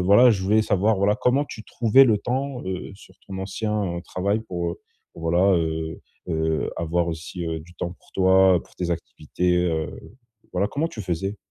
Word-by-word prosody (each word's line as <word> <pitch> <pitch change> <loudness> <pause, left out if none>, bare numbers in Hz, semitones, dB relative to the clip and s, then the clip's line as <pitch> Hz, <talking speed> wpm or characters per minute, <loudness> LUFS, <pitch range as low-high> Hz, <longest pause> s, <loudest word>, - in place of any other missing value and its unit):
voilà, 100 +7 +7
je 95 -4 0
voulais 105 +3 +3
savoir, 105 +2 +2
voilà, 100 +2 +3
comment 130 +3 +2
tu 110 -6 -9
trouvais 120 +3 +5
le 110 -4 +4
temps, 130 +3 -3
heu, 95 +1 -4
sur 95 -1 -17
ton 95 -1 -6
ancien, 100 -2 -2
heu, - - -8
travail 100 +4 -1
pour, 85 -5 -3
heu, - - -12 0.3
pour - - -12
voilà, 90 +4 +3
heu, 80 -1 -2 0.3
heu, 80 -1 0
avoir 85 +1 0
aussi, 85 +2 -5
heu, 80 -1 -3
du 90 +3 -15
temps 85 +1 -4
pour - - -25
toi, 95 -1 +5
pour - - -23
tes 90 -1 -2
activités, 85 +1 -1
heu, 80 -2 -1 0.6
voilà, 95 +2 +1
comment 150 +8 -1
tu 110 - -7
faisais? 95 +3 -2
95 Hz, 195 wpm, -24 LUFS, 85-105 Hz, 0.6 s, voilà